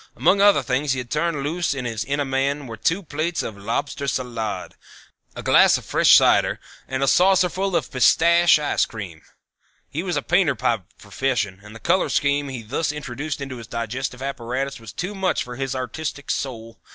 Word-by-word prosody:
Among 200 +1 +3
other 200 -9 +5
things 130 +3 0
that - - -3
he 125 - -2
turned 150 +3 -1
loose 155 -1 -1
in 130 -2 -4
his 115 -2 -2
inner 140 +1 -1
man 135 +2 -1
were 115 -3 -7
two 165 - 0
plates 160 +2 -2
of 110 - -5
Lobster 140 +7 -3
Salade, 120 -5 -3 0.6
a - - -7
glass - - +5
of - - -10
fresh - - +5
cider - - +4 0.3
and 130 +1 -2
a - - +2
saucerful 185 +2 +3
of - - -1
pistache 170 +6 +5
ice 150 -1 +1
cream. 95 -8 -8 0.7
He 155 - -2
was 180 -1 -2
a - - -1
painter 175 -6 +2
by 115 -4 0 0.2
profession 105 -3 -2
and 105 +1 -12
the - - -9
color 185 +8 +1
scheme 145 0 +1
he 125 -4 -6
thus 140 +8 -1
introduced 145 0 -5
into 135 -2 -5
his 115 -2 -10
digestive 125 +3 -4
apparatus 135 0 -3
was 115 -2 -10
too 180 +3 -4
much 190 -8 0
for 125 0 -8
his 135 +1 -3
artistic 140 +2 -4
soul. 115 -4 -5
135 Hz, 190 wpm, -22 LUFS, 120-155 Hz, 0.7 s, other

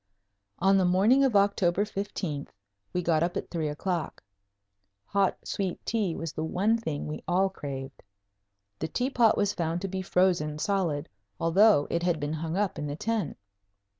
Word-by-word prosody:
On 195 +3 +4
the - - +3
morning 200 +10 +4
of 260 -5 +2
October 200 -1 +3
15th 190 -8 -4 0.4
we 180 - -1
got 165 -2 +2
up 175 +1 0
at - - -5
three 160 -3 -1
o'clock. 165 +3 -3 0.8
Hot 200 -1 +1
sweet 190 -3 -2
tea 205 -7 0
was 165 -2 -5
the 155 - -3
one 195 +7 +1
thing 160 -11 -3
we 150 - -5
all 190 +2 +3
craved. 135 -6 -7 0.8
The 160 - -2
tea 250 - -1
pot 235 -4 +4
was 205 0 +1
found 170 -1 -1
to 195 - -2
be 190 0 -3
frozen 180 -5 +1
solid, 165 -5 0 0.3
although 180 -1 +5
it 170 - 0
had 175 -2 +1
been 145 +1 -2
hung 160 +2 -3
up 205 -3 0
in 150 - -3
the 145 - -3
tent. 210 -3 -2
180 Hz, 170 wpm, -28 LUFS, 160-200 Hz, 0.8 s, although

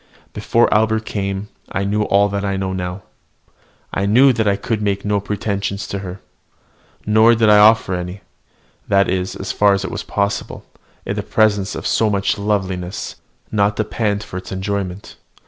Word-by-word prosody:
Before 120 +1 +2
Albert 110 +1 +2
came, 100 0 -3 0.2
I 95 - -1
knew 105 +2 0
all 100 -1 +3
that 100 0 -3
I 100 -1 -1
know 95 -1 -2
now. 90 +1 -4 0.9
I 100 - 0
knew 130 +6 +6
I 105 -3 +2
could 105 +2 -3
make 100 -1 -1
no 105 0 +1
pretensions 100 0 -3
to 100 - -3
her, 95 -1 -7 0.9
nor 110 +2 +5
did 110 -2 +4
I 105 - +7
offer 105 -2 +5
any, 90 +2 -5 0.7
that 100 0 +3
is, 90 0 -2
as 95 - -4
far 105 -1 +4
as 100 0 -1
it - - -5
was - - -4
possible, 100 0 -3 0.4
in - - -2
the - - -2
presence 105 -3 +1
of - - -6
so 110 - +2
much 100 0 0
loveliness, 95 -3 -2 0.3
not 100 -1 +1
to 110 - +1
pant 105 -1 -1
for 90 - -7
its 95 - -8
enjoyment. 95 0 -4
100 Hz, 175 wpm, -19 LUFS, 95-105 Hz, 0.9 s, I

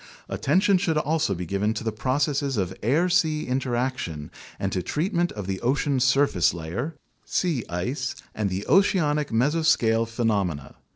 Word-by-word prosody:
Attention 190 0 +2
should 165 -5 0
also 150 -8 +1
be 90 +1 -5
given 100 +5 -1
to 110 - -4
the 110 - -1
processes 135 +4 0
of 95 -2 -1
air 150 +11 +2
sea 160 -4 +1
interaction 125 - -2 0.3
and 95 - -2
to 95 - -1
treatment 175 - -1
of 105 -3 -6
the 95 0 -3
ocean's 135 +1 +1
surface 135 -11 +3
layer, 95 - -4 0.3
sea 160 -10 0
ice, 125 - -2 0.2
and 105 -2 -1
the 95 +2 -3
oceanic 150 -3 +3
mesoscale 115 -3 +2
phe 115 +1 -4
nomena. 90 -10 -1
125 Hz, 155 wpm, -25 LUFS, 100-150 Hz, 0.3 s, surface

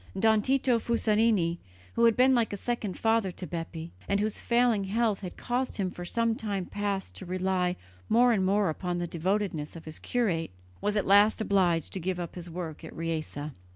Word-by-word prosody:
Don 220 +1 +4
Tito 260 0 +2
Fusarini, 215 -6 +2 0.3
who 235 - +3
had 230 -2 +4
been 260 +1 +6
like 235 -3 +2
a 205 - -3
second 215 -3 -3
father 225 -4 +2
to 180 - -6
Bepi, 165 -1 -6 0.2
and 200 - +1
whose 210 0 -2
failing 235 -4 +2
health 215 0 +1
had 185 -3 -7
caused 250 +1 -2
him 190 -3 -1
for 175 - -7
some 230 +5 +1
time 205 -4 -3
past 200 -1 -3
to 190 - -8
rely 185 0 0 0.3
more 240 +2 +5
and 195 -4 +1
more 195 -2 +2
upon 175 +2 -3
the 175 - -1
devotedness 175 -2 -2
of 165 - -10
his 155 0 -7
curate, 195 -10 0 0.3
was 205 0 0
at 205 - +1
last 205 +3 +5
obliged 185 -7 +1
to 190 - -2
give 180 +1 -2
up 170 -2 -5
his 175 -1 -7
work 165 -2 -6
at 160 - -9
Riese. 165 -2 -3
195 Hz, 195 wpm, -29 LUFS, 175-225 Hz, 0.3 s, been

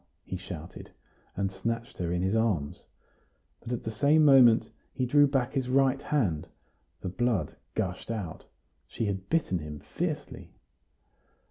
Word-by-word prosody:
he - - -5
shouted, 90 -2 -8 0.5
and 95 0 -1
snatched 115 +5 -4
her 85 -1 -1
in 90 +1 0
his 95 +3 +1
arms. 100 -11 0 0.7
But 120 - -8
at 120 - -2
the 110 - -3
same 145 +7 +4
moment 125 -5 +6 0.2
he 130 - -1
drew 145 +3 +5
back 135 -2 0
his 130 -3 -1
right 135 +1 +3
hand; 110 - 0 0.5
the 90 - -3
blood 110 -4 0 0.2
gushed 95 -3 -3
out; 105 -8 -5 0.4
she 115 - -3
had 95 -2 -3
bitten 155 - +1
him 75 -1 -7
fiercely. - - -4
110 Hz, 145 wpm, -29 LUFS, 90-130 Hz, 0.7 s, moment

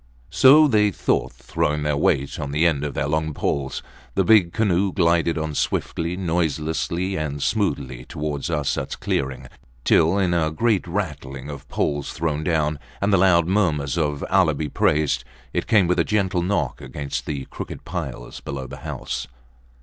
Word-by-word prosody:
So 150 +4 +7
they 105 -5 +4
thought, 100 - 0
throwing 75 0 -2
their 75 -1 +1
weight 70 -1 +1
on 70 - -3
the 75 +4 +1
end 75 -4 +2
of 75 - -4
their - - 0
long 80 0 -1
poles. 70 -2 -2 0.3
The - - +3
big 105 -6 +5
canoe 100 -2 +1
glided 85 -2 +2
on 80 -1 -2
swiftly, 85 +3 -1
noiselessly, 85 +1 -1
and 75 -2 -3
smoothly, 70 - -1
towards 75 +2 -4
Arsats 75 -4 -1
clearing, 65 -2 -2 0.4
till, 85 +4 +4
in 95 -3 +2
a 80 -2 +2
great 100 +3 +1
rattling 75 -7 -4
of 70 - -10
poles 75 -1 -1
thrown 80 -2 -2
down, 75 -2 0 0.2
and 100 +1 +1
the - - +6
loud 85 -3 +5
murmurs 80 -7 +1
of 75 -4 -1
Allah 90 -6 +4
be 75 +1 -3
praised! 75 - +1 0.3
it - - -1
came 105 -5 +5
with 90 +1 +1
a - - +5
gentle 95 -4 0
knock 85 -8 -1
against 70 +1 -5
the 70 -3 -3
crooked - - -7
piles 70 -8 -5
below 70 -1 -5
the 70 +2 -8
house. - - -5
80 Hz, 165 wpm, -23 LUFS, 70-90 Hz, 0.4 s, So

